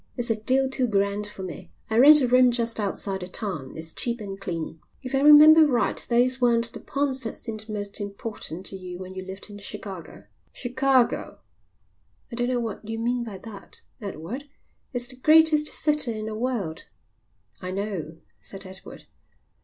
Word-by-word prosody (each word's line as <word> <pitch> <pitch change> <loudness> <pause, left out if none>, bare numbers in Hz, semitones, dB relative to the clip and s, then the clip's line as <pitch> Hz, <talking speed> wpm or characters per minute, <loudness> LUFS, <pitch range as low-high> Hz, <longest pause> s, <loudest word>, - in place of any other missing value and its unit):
"It's 240 -1 -1
a - - +2
deal 260 +5 +1
too 265 -1 0
grand 200 0 0
for 200 -2 -8
me. 180 -3 -8 0.2
I 220 +1 +1
rent 295 +3 +9
a 255 - +2
room 250 +1 +6
just 235 -2 0
outside 195 -1 -2
the 180 - -6
town. 180 -9 -4
It's 160 0 -2
cheap 240 0 -2
and 195 -2 -7
clean." 165 -3 -4 0.2
"If 255 - -6
I 270 - +3
remember 305 +2 +9
right 240 -7 +1
those 250 +2 +2
weren't 235 -1 +2
the - - -7
points 275 -2 -1
that 225 - -3
seemed 220 -1 -7
most 205 0 -4
important 200 -3 -6
to 195 - -4
you 180 -1 -7
when 185 0 -8
you 190 0 -6
lived 190 +2 -8
in 205 - -9
Chicago." 200 -3 -8 0.3
"Chicago!" 255 0 +1 0.9
"I - - -5
don't 245 +1 0
know 250 -1 +1
what 225 -3 -4
you 225 - -3
mean 240 +1 -1
by 215 -4 -7
that, 205 0 -9 0.2
Edward. 210 - -6 0.4
It's 245 -3 -1
the 255 0 -11
greatest 310 +2 +5
city 295 -9 +1
in 215 - -4
the 220 0 -4
world." 215 -9 -3 0.7
"I 185 - -5
know," 185 -5 -4 0.2
said 195 0 -9
Edward. 190 0 -11
225 Hz, 180 wpm, -25 LUFS, 195-255 Hz, 0.9 s, rent